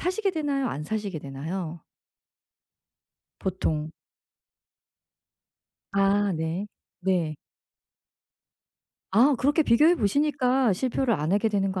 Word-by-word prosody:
사시게 390 +3 0
되나요? 285 -6 -1
안 150 -7 -4
사시게 205 -3 -3
되나요? 160 +4 -6 1.6
보통. 160 -4 -2 2.0
아 200 0 +3
네. 165 +4 -3 0.3
네. 175 -5 0 1.8
아. 260 +7 +5
그렇게 295 +5 +3
비교해 300 +8 +5
보시니까 265 - +2
실패를 250 +4 0
안 155 0 -1
하게 210 +2 +2
되는 195 -2 0
거 190 - -3
205 Hz, 195 characters per minute, -26 LUFS, 175-270 Hz, 2.0 s, 아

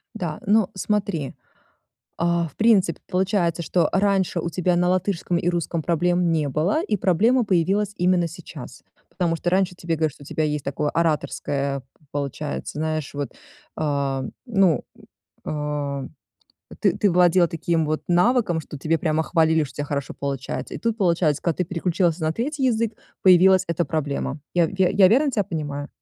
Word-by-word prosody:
Да, 170 -8 -4
ну, 210 -1 +4
смотри. 195 -7 -2 0.8
Э, 170 0 +1
в - - -30
принципе, 210 -7 +3
получается, 180 -3 0
что 170 +3 +1
раньше 190 -3 +1
у 170 - -3
тебя 180 +1 +1
на 180 0 +2
латышском 185 -1 0
и 175 - -1
русском 170 -1 -1
проблем 175 +1 +1
не 155 -3 +1
было, 170 - +1
и 215 - 0
проблема 220 +8 +3
появилась 195 +2 +1
именно 180 -1 +2
сейчас. 165 - -10 0.3
Потому 170 -3 -1
что 175 - -2
раньше 185 0 +1
тебе 170 -2 -3
говорили, 155 -2 0
что 145 - -17
у - - -13
тебя 155 - -1
есть 150 -2 -2
такое 145 +2 -1
ораторское, 140 -3 -1
п - - -24 0.3
получается, 145 +1 -4
знаешь, 155 -2 -2
вот, 145 -1 -4 0.4
а, 140 -3 -1 0.2
ну, 195 -8 +3 0.6
э, - - -4
э, 145 -2 -3 0.7
т - - +3
ты 205 - +3
владел, 175 0 +4
а, 170 - 0
таким 165 0 0
вот 155 0 -1
навыком, 180 -1 +3
что 150 -1 -9
тебя 160 +3 0
прямо 155 0 0
хвалили, 160 -1 +2
что 135 - -11
у - - -20
тебя 145 - -2
хорошо 140 -2 -3
получается, 135 -2 -4
и - - -4
тут 230 -1 -1
получается, 170 -7 +1
когда 170 - 0
ты 180 - +1
переключилась 175 0 0
на 155 -1 0
3 270 - -2
язык, 230 -2 +1 0.3
появилась 185 0 +6
эта 170 +1 0
проблема. 145 -1 -3
Я 170 -2 +3
я 190 -1 +4
я 195 -1 +5
верно 275 +7 +3
тя 210 -5 0
понимаю? 145 -4 -4
170 Hz, 175 wpm, -23 LUFS, 155-190 Hz, 0.8 s, появилась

